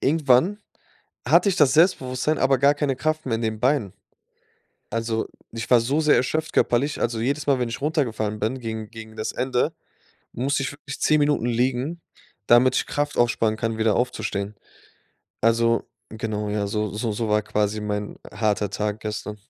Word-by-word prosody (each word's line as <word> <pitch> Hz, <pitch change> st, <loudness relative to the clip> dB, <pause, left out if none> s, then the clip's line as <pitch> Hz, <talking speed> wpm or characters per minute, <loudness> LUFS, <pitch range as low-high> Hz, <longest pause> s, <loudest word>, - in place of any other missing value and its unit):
irgendwann 150 Hz, +6 st, +3 dB, 0.7 s
hatte 200 Hz, -, +5 dB
ich 185 Hz, -, +1 dB
das 140 Hz, -3 st, +5 dB
Selbstbewusstsein, 150 Hz, -3 st, +2 dB
aber 135 Hz, -1 st, +3 dB
gar 140 Hz, +2 st, +4 dB
keine 140 Hz, -3 st, -1 dB
Kraft 155 Hz, +2 st, -1 dB
mehr 115 Hz, -3 st, 0 dB
in 115 Hz, -, -5 dB
den 110 Hz, -1 st, -2 dB
Beinen. 130 Hz, -7 st, +1 dB, 1.0 s
Also, 115 Hz, 0 st, -2 dB, 0.2 s
ich 115 Hz, 0 st, -6 dB
war 120 Hz, -2 st, +7 dB
so 135 Hz, +7 st, 0 dB
sehr 150 Hz, -1 st, +4 dB
erschöpft 155 Hz, +5 st, -1 dB
körperlich, 140 Hz, +5 st, +1 dB
also, 115 Hz, -1 st, -1 dB
jedes 140 Hz, +5 st, -1 dB
Mal, 135 Hz, -2 st, +3 dB
wenn 120 Hz, -, 0 dB
ich 115 Hz, -, -5 dB
runtergefallen 115 Hz, -9 st, -1 dB
bin 115 Hz, +5 st, -1 dB
gegen 110 Hz, -2 st, -5 dB
gegen 110 Hz, -1 st, -11 dB
das 110 Hz, -, -3 dB
Ende, 125 Hz, -1 st, 0 dB, 0.6 s
musste 135 Hz, +3 st, 0 dB
ich 135 Hz, -, -3 dB
wirklich 140 Hz, -1 st, -9 dB
10 155 Hz, -, +4 dB
Minuten 145 Hz, -5 st, +2 dB
liegen, 130 Hz, +7 st, -1 dB, 0.5 s
damit 125 Hz, +2 st, +5 dB
ich -, -, +1 dB
Kraft 145 Hz, 0 st, -2 dB
aufsparen 115 Hz, -2 st, +2 dB
kann, 115 Hz, 0 st, -2 dB
wieder 110 Hz, -3 st, +2 dB
aufzustehen. 105 Hz, -4 st, -2 dB, 0.9 s
Also, 115 Hz, +1 st, +3 dB, 0.3 s
genau, 105 Hz, -1 st, -3 dB
ja, 105 Hz, -1 st, -1 dB
so 105 Hz, -1 st, -1 dB
so 110 Hz, +1 st, -2 dB
so 110 Hz, +1 st, -2 dB
war 105 Hz, 0 st, +2 dB
quasi 105 Hz, 0 st, -1 dB
mein 105 Hz, 0 st, -3 dB, 0.2 s
harter 105 Hz, -2 st, 0 dB
Tag 105 Hz, +1 st, -2 dB
gestern. 105 Hz, -1 st, -5 dB
120 Hz, 170 wpm, -24 LUFS, 110-140 Hz, 1.0 s, war